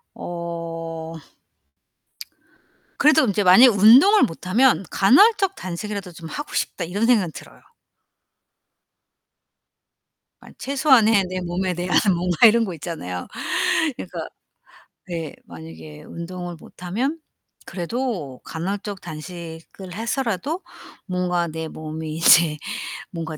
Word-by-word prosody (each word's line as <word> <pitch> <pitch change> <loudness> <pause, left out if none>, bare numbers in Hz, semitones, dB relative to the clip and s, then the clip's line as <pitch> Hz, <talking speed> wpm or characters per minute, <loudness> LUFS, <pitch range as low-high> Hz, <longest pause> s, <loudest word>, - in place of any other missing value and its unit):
어. 165 -1 -6 1.8
그래도 305 0 +5
인제 205 -2 0
만약에 190 +8 +8
운동을 245 - +6
못 180 -6 -3
하면 230 +1 +3
'간헐적 390 - +4
단식이라도 190 +1 -6
좀 165 -1 -10
하고 290 - -7
싶다.' - - -2
이런 200 +6 -1
생각은 215 -8 +2
들어요. - - -13 2.8
만 - - -16
최소한의 250 -7 +3
내 185 0 -3
몸에 180 +1 -2
대한 180 +1 0 0.2
뭔가 175 +4 +3
이런 230 +1 +3
거 190 - -5
있잖아요. 145 - -6 0.7
그러니까 - - -7 0.8
네. 165 -4 -5
만약에 80 -2 -11
운동을 175 +1 -7
못 175 - -15
하면 250 - -2 0.5
그래도 180 - -4
간헐적 195 +4 -5
단식을 170 +2 -9
해서라도 240 - -2 0.4
뭔가 180 -2 -1
내 160 0 -5
몸이 155 0 -7
이제 165 -1 +5 0.5
뭔가 160 -3 -6
180 Hz, 235 characters per minute, -22 LUFS, 165-225 Hz, 2.8 s, 만약에